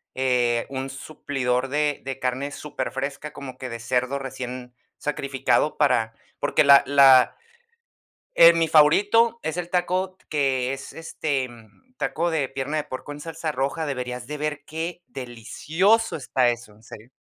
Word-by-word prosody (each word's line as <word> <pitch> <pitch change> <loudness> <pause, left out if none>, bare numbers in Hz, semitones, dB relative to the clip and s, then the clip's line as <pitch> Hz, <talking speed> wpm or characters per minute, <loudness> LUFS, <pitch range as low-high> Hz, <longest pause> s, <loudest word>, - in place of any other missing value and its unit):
eh, 125 -2 +1
un 135 0 -4
suplidor 135 -2 -2
de 150 0 0
de 135 -1 -5
carne 130 +3 -2
superfresca, 140 +1 -5
como 140 -3 -9
que 130 - -6
de 115 0 -6
cerdo 125 +3 -1
recién 125 -2 -7 0.2
sacrificado 140 +1 0
para 125 -6 +2 0.3
porque - - +2
la 140 -1 +8
la 135 -2 +6 1.0
eh, 170 0 +9
mi 165 -1 +1
favorito 205 +10 +4
es 160 +2 -3
el 175 -1 -4
taco 185 +1 -1
que 135 -3 0
es, 135 - -8
este, 150 -4 -3 0.5
taco 170 +1 -1
de 145 -5 -1
pierna 135 +3 -3
de 150 - -1
puerco 130 0 -8
en 145 - -8
salsa 165 0 -4
roja. 140 +4 -2
Deberías 125 -3 -4
de 150 +3 -6
ver 150 -1 -3
qué 165 +2 -5
delicioso 145 - 0
está 130 -3 +1
eso, 120 -3 -5
en 105 - -22
serio. 110 +1 -12
140 Hz, 150 wpm, -24 LUFS, 125-155 Hz, 1.0 s, eh